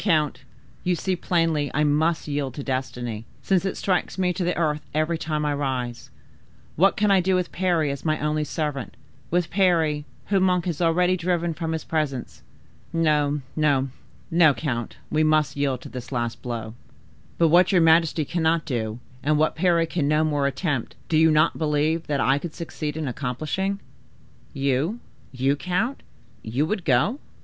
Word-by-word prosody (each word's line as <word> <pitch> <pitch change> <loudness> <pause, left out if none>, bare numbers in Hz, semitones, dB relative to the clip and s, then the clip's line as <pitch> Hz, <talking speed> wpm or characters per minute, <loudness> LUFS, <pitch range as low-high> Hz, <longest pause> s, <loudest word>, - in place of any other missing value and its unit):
count, 155 -7 +1 0.4
you 180 0 +1
see 185 +2 -1
plainly 165 -4 +1
I 150 - +3
must 155 +3 +1
yield 145 -3 -2
to 140 - -5
destiny, 125 -4 -3 0.2
since 190 -1 +2
it 195 - -2
strikes 185 -1 -1
me 180 -1 +1
to 180 - -2
the 175 +1 0
earth 150 -3 0
every 155 +2 +1
time 155 -2 -2
I 145 - +1
rise. 130 -4 -3 0.7
What 190 +5 +4
can 210 0 +3
I 195 - +6
do 190 +1 +2
with 180 -2 -1
Parry 170 -5 +1
as 140 -1 -6
my 155 -1 0
only 150 +1 0
servant, 150 -4 -4 0.3
with 175 0 0
Parry, 165 -6 +2 0.2
whom 195 -2 +3
Monk 180 -2 +2
has 175 -2 -2
already 180 +2 +3
driven 175 -1 0
from 160 +1 -3
his 160 - -3
presence? 145 - -3 0.5
No, 150 -3 +1
no, 140 -3 +2 0.4
no, 160 -4 +5
count, 120 -7 -3
we 155 0 +2
must 155 -1 +2
yield 140 -3 -1
to - - -9
this 125 0 -8
last 120 -2 -2
blow." 115 -3 -5 0.6
"But 165 -1 +4
what 175 +3 +5
your 180 -3 +4
majesty 165 -1 +4
cannot 165 0 +1
do, 115 -6 -2 0.2
and 150 +1 +2
what 155 +1 +2
Parry 170 -1 +3
can 165 -4 -1
no 150 +1 +3
more 145 -3 +1
attempt, 140 -3 -2
do 160 - +1
you 160 +1 +6
not 155 0 +3
believe 155 +1 0
that 145 -2 0
I 135 +2 +3
could 160 +1 -7
succeed 155 -3 -5
in 155 -2 -2
accomplishing?" 155 +10 -2 0.7
"You—you, 135 - -1
count—you 180 - -3
would 190 +1 -3
go?" 150 - +2
155 Hz, 170 wpm, -24 LUFS, 140-170 Hz, 0.7 s, I